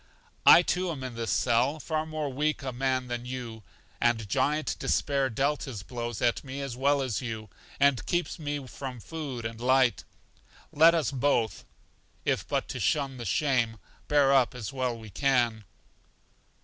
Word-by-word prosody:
I, 175 Hz, -, +10 dB
too, 180 Hz, 0 st, 0 dB
am 145 Hz, -6 st, -4 dB
in 130 Hz, -2 st, -5 dB
this 115 Hz, -1 st, -4 dB
cell, 130 Hz, +5 st, +2 dB
far 155 Hz, +1 st, -2 dB
more 155 Hz, -1 st, -3 dB
weak 150 Hz, 0 st, -1 dB
a 130 Hz, -, -3 dB
man 130 Hz, 0 st, -1 dB
than 120 Hz, 0 st, -4 dB
you, 120 Hz, -3 st, -6 dB, 0.4 s
and 115 Hz, -3 st, +2 dB
Giant 150 Hz, +10 st, 0 dB
Despair 140 Hz, -2 st, +1 dB
dealt 140 Hz, +5 st, 0 dB
his 115 Hz, -9 st, -6 dB
blows 120 Hz, +1 st, -5 dB
at 120 Hz, -1 st, +1 dB
me 135 Hz, 0 st, -6 dB
as 135 Hz, -3 st, -4 dB
well 140 Hz, +2 st, +2 dB
as 115 Hz, -8 st, -2 dB
you, 110 Hz, -3 st, -6 dB, 0.3 s
and 140 Hz, -3 st, +3 dB
keeps 175 Hz, 0 st, -1 dB
me 145 Hz, -2 st, -3 dB
from 130 Hz, -1 st, -7 dB
food 135 Hz, -4 st, -6 dB
and 115 Hz, 0 st, -5 dB
light. 130 Hz, 0 st, +3 dB, 0.7 s
Let 165 Hz, +3 st, +6 dB
us 155 Hz, -6 st, 0 dB
both 130 Hz, -4 st, 0 dB, 0.6 s
(if -, -, 0 dB
but -, -, -1 dB
to -, -, -4 dB
shun 140 Hz, -3 st, 0 dB
the 120 Hz, -, -6 dB
shame) 120 Hz, -7 st, +1 dB, 0.3 s
bear 145 Hz, -2 st, +4 dB
up 130 Hz, -2 st, +3 dB
as 125 Hz, +1 st, -6 dB
well 130 Hz, -2 st, -1 dB
as 115 Hz, -, -11 dB
we 110 Hz, -2 st, -11 dB
can. 120 Hz, -3 st, +1 dB
130 Hz, 175 wpm, -28 LUFS, 120-145 Hz, 0.7 s, I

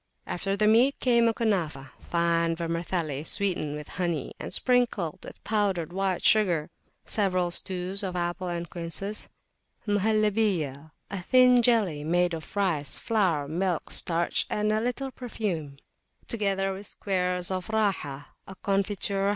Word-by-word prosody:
After 195 Hz, +2 st, -2 dB
the 210 Hz, -, +2 dB
meat 235 Hz, +6 st, +4 dB
came 235 Hz, -2 st, +4 dB
a -, -, +4 dB
Kunafah, 165 Hz, -, -1 dB
fine 170 Hz, -1 st, +1 dB
vermicelli 165 Hz, -3 st, -2 dB
sweetened 175 Hz, -5 st, -1 dB
with 150 Hz, -1 st, -7 dB
honey, 170 Hz, -6 st, -2 dB
and -, -, -6 dB
sprinkled 240 Hz, -10 st, +1 dB
with -, -, -11 dB
powdered 195 Hz, -6 st, 0 dB
white 190 Hz, -1 st, -1 dB
sugar; 175 Hz, -8 st, +3 dB, 0.3 s
several 185 Hz, -4 st, 0 dB
stews 185 Hz, +2 st, +2 dB
of 185 Hz, -2 st, -3 dB
apples 175 Hz, +1 st, -2 dB
and 170 Hz, 0 st, -4 dB
quinces; 175 Hz, +5 st, -4 dB, 0.6 s
Muhallibah, 205 Hz, -8 st, +1 dB, 0.2 s
a 195 Hz, -2 st, -3 dB
thin 250 Hz, +4 st, +5 dB
jelly 210 Hz, -11 st, +2 dB
made 175 Hz, +2 st, +2 dB
of 160 Hz, +3 st, -7 dB
rice, 170 Hz, -8 st, 0 dB
flour, 180 Hz, -10 st, +1 dB
milk, 175 Hz, +2 st, -1 dB
starch, 170 Hz, 0 st, 0 dB
and 210 Hz, 0 st, 0 dB
a 215 Hz, 0 st, +1 dB
little 250 Hz, +3 st, -2 dB
perfume; 190 Hz, -, -4 dB, 0.5 s
together 195 Hz, -3 st, 0 dB
with 195 Hz, +1 st, -7 dB
squares 180 Hz, -2 st, -1 dB
of 185 Hz, -1 st, -3 dB
Rahah,[FN#15] 195 Hz, -10 st, -1 dB, 0.2 s
a 195 Hz, -, -9 dB
confiture 195 Hz, 0 st, 0 dB
[p. -, -, +3 dB
185 Hz, 140 wpm, -27 LUFS, 170-210 Hz, 0.6 s, thin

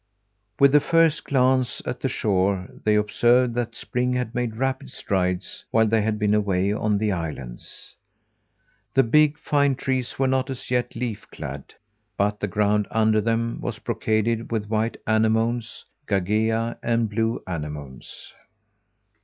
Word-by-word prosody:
With 140 Hz, 0 st, +6 dB
the 150 Hz, -, +6 dB
first 165 Hz, 0 st, +2 dB
glance 130 Hz, -2 st, +2 dB
at 125 Hz, -, -4 dB
the 135 Hz, -, -1 dB
shore 95 Hz, -4 st, 0 dB, 0.2 s
they 105 Hz, 0 st, +4 dB
observed 120 Hz, +4 st, +3 dB
that 120 Hz, -1 st, -3 dB
spring 125 Hz, +1 st, -1 dB
had 125 Hz, -2 st, -2 dB
made 120 Hz, -2 st, -2 dB
rapid 130 Hz, +2 st, -2 dB
strides 90 Hz, -1 st, -2 dB
while 110 Hz, 0 st, +3 dB
they 110 Hz, 0 st, +2 dB
had 105 Hz, 0 st, 0 dB
been 105 Hz, 0 st, +1 dB
away 100 Hz, -1 st, +1 dB
on 105 Hz, -1 st, 0 dB
the 105 Hz, 0 st, 0 dB
islands. 75 Hz, -9 st, -6 dB, 1.0 s
The 135 Hz, -, +6 dB
big, 150 Hz, +5 st, +4 dB
fine 140 Hz, -3 st, +1 dB
trees 130 Hz, -1 st, -2 dB
were 135 Hz, -, +2 dB
not 130 Hz, +1 st, +1 dB
as 135 Hz, 0 st, -7 dB
yet 125 Hz, -1 st, 0 dB
leaf 115 Hz, -3 st, -4 dB
clad, 70 Hz, +1 st, -8 dB, 0.4 s
but 105 Hz, +1 st, 0 dB
the 100 Hz, -, -1 dB
ground 105 Hz, +1 st, +1 dB
under 110 Hz, -1 st, +2 dB
them 115 Hz, +1 st, -1 dB
was -, -, -4 dB
brocaded 110 Hz, +2 st, -1 dB
with 105 Hz, -2 st, -2 dB
white 110 Hz, +1 st, 0 dB
anemones, 110 Hz, +1 st, 0 dB, 0.2 s
gagea, 110 Hz, +4 st, 0 dB
and 115 Hz, -1 st, +1 dB
blue 115 Hz, +2 st, -1 dB
anemones. 75 Hz, -6 st, -7 dB
110 Hz, 145 wpm, -24 LUFS, 105-125 Hz, 1.0 s, With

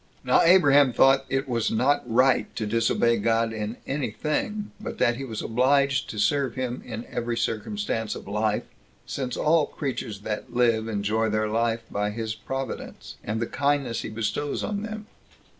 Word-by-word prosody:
2. -, -, -18 dB
Now -, -, +6 dB
Abraham 145 Hz, -7 st, +6 dB
thought 135 Hz, +2 st, +4 dB
that -, -, 0 dB
it 135 Hz, +1 st, -1 dB
was 115 Hz, -3 st, 0 dB
not 140 Hz, +6 st, +2 dB
right 130 Hz, +3 st, +3 dB
to 110 Hz, -, -2 dB
disobey 115 Hz, +2 st, +2 dB
God 115 Hz, 0 st, +1 dB
in 110 Hz, +1 st, -4 dB
any 135 Hz, -2 st, -2 dB
thing, 205 Hz, -, -2 dB
but -, -, -6 dB
that 120 Hz, 0 st, +2 dB
he 135 Hz, -, -5 dB
was 110 Hz, -5 st, -5 dB
obliged 135 Hz, +3 st, +2 dB
to 110 Hz, -, -6 dB
serve 135 Hz, +3 st, +1 dB
him 130 Hz, -1 st, -3 dB
in 115 Hz, 0 st, -6 dB
every 120 Hz, 0 st, -3 dB
circumstance 110 Hz, -1 st, -2 dB
of -, -, -9 dB
life, 105 Hz, +1 st, 0 dB, 0.4 s
since 130 Hz, -3 st, -4 dB
all 155 Hz, -1 st, +3 dB
creatures 120 Hz, -7 st, -4 dB
that 105 Hz, 0 st, -4 dB
live 115 Hz, -2 st, +2 dB
enjoy 110 Hz, +1 st, 0 dB
their 110 Hz, 0 st, 0 dB
life 115 Hz, +1 st, 0 dB
by 105 Hz, 0 st, 0 dB
his 110 Hz, +1 st, -3 dB
providence, 135 Hz, +2 st, -6 dB
and 110 Hz, +1 st, -2 dB
the 115 Hz, -, 0 dB
kindness 140 Hz, -2 st, 0 dB
he -, -, -5 dB
bestows 110 Hz, +6 st, -2 dB
on 205 Hz, -1 st, -2 dB
them. 215 Hz, 0 st, -6 dB
120 Hz, 175 wpm, -26 LUFS, 110-135 Hz, 0.4 s, Now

